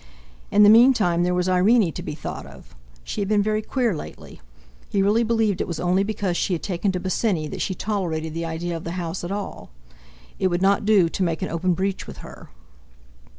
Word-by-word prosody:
In 205 +1 +5
the 205 - +8
meantime 220 -7 +5
there 180 +1 +1
was 180 0 0
Irene 185 +1 +3
to - - -6
be - - -5
thought - - -7
of! - - -15 0.3
She 130 - -4
had 200 - -1
been 205 0 +2
very 215 +1 0
queer 235 -2 -1
lately. - - -10 0.5
He 195 -1 +1
really 210 +4 +3
believed 225 -4 +1
it - - -2
was 170 -3 -4
only 180 +2 +2
because 200 -3 -2
she 185 - 0
had 170 - -3
taken 190 +1 -1
to 180 - -2
Bosinney 185 -3 -1
that - - -5
she 190 - -2
tolerated 165 -7 -3
the 165 +1 -3
idea 165 +1 -3
of 165 - -6
the 170 - -5
house 170 0 -4
at 175 - -4
all. 200 0 -5 0.7
It 190 - +2
would 175 -1 0
not 200 +1 +3
do 205 -5 +5
to 165 - -5
make 165 -2 -1
an - - -2
open 175 +2 0
breach 190 +2 -2
with - - -9
her. - - -12
185 Hz, 220 wpm, -23 LUFS, 170-210 Hz, 0.7 s, the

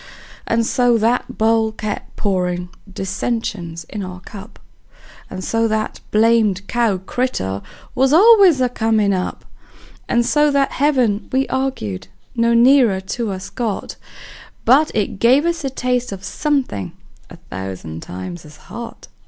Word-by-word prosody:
And 230 0 +1
so 245 -1 +3
that 245 +3 0
bowl 220 0 +2
kept 215 -1 -6
pourin' 180 -3 -1 0.2
dissensions 190 -3 -3
in 205 +6 -7
our 185 -1 -7
cup; 205 +3 -11 0.7
And 185 0 -6
so 225 +3 +1
that 215 0 -2
blamed 215 -3 +2
cow 230 -5 +1
critter 185 - -2 0.3
was 265 +1 +2
always 385 - +7
a 250 - +4
comin' 220 -4 +1
up; 185 -1 -3 0.6
And 240 0 +2
so 295 +3 +3
that 280 -1 +1
heaven 250 -8 +1
we 265 +1 +2
arg'ed 260 - -3 0.3
no 235 0 +2
nearer 240 -4 +5
to 210 +4 -4
us 190 0 -6
got, 225 -5 -3 0.7
But 285 +6 +5
it 205 -2 -1
gave 260 +8 +4
us 340 -2 -1
a 270 - -1
taste 250 -2 -1
of 190 -1 -7
somethin' 255 - -2 0.4
a - - -11 0.2
thousand 95 -4 -6
times 90 -1 -7
as 150 0 -14
hot. 235 +8 -9
225 Hz, 140 wpm, -19 LUFS, 190-250 Hz, 0.7 s, always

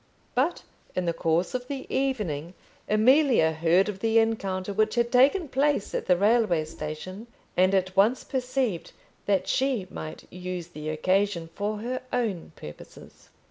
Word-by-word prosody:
But, 270 +8 0 0.3
in 185 - -1
the 170 - 0
course 165 +2 0
of 250 0 -3
the 275 -1 -5
evening, 190 - -1 0.3
Amelia 240 - +4
heard 165 +4 +3
of 205 -2 -4
the 225 +2 +2
encounter 200 -4 0
which 215 +2 +1
had 235 0 +1
taken 280 +8 +4
place 275 -4 0
at - - -3
the 180 - +4
railway 205 -5 +3
station, 160 +7 -7 0.3
and 185 +2 +4
at 185 0 0
once 215 +6 +3
perceived 255 -7 -2 0.3
that 200 -2 +1
she 260 -7 0
might 155 0 -7
use 180 -1 -5
the 155 -2 -6
occasion 175 +1 0
for 210 +2 -3
her 255 +3 -3
own 215 -10 -2
purposes. 75 - -12
200 Hz, 150 wpm, -26 LUFS, 175-245 Hz, 0.3 s, Amelia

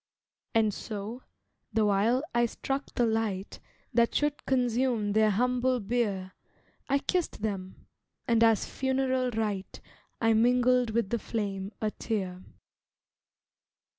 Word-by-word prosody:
And 220 -2 +3
so, 215 +5 -6 0.5
the 220 0 +2
while 210 +6 +2
I 240 0 +3
struck 270 +4 -3
the 240 - +3
light 220 -4 -1 0.3
That 235 -1 +3
should 295 0 0
consume 245 -4 +1
their 215 0 +4
humble 250 +4 +1
bier 200 -4 -1 0.6
I 275 - +4
kissed 335 - -2
them, 190 -3 -4 0.4
and 230 -1 +4
as 225 -2 +4
funeral 260 -1 0
rite 210 -4 -3 0.4
I 225 -1 +3
mingled 245 +1 +3
with 220 -2 0
the 235 - +1
flame 200 -3 -3
a 215 -1 0
tear. 190 -6 -3
225 Hz, 120 wpm, -29 LUFS, 205-250 Hz, 0.6 s, their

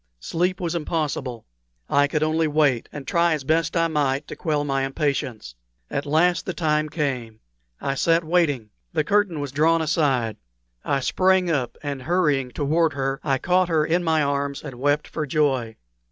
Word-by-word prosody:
Sleep 180 - -1
was 170 -2 -2
impossible. 150 -7 -3 0.4
I 145 0 +3
could 150 +1 0
only 160 +1 +1
wait, 145 -5 +1
and 145 -2 -8
try 170 +2 +2
as 150 -3 -3
best 160 +4 +1
I 165 0 +3
might 145 -2 0
to - - -6
quell 150 -4 -1
my 135 -2 0
impatience. 135 - -2 0.4
At 140 +1 -2
last 170 +4 +2
the 185 - -3
time 155 -1 +1
came. 125 -8 -3 0.4
I 135 - -1
sat 165 +4 +2
waiting. 155 -10 +1 0.2
The 155 -2 +1
curtain 200 -2 +1
was 145 -2 -4
drawn 160 +4 +3
aside. 140 - +1 0.5
I 140 -1 0
sprang 185 +4 +2
up, 135 -6 -1
and, 140 -2 -4
hurrying 150 -5 +1
toward 155 +4 +1
her, 135 0 -2
I 135 -2 +1
caught 180 +5 +2
her 155 -2 +2
in 175 +3 +1
my 160 -2 +2
arms 140 0 -2
and 135 -5 -8
wept 145 +2 +1
for 155 -2 -4
joy. 130 -6 0
150 Hz, 175 wpm, -23 LUFS, 135-165 Hz, 0.5 s, I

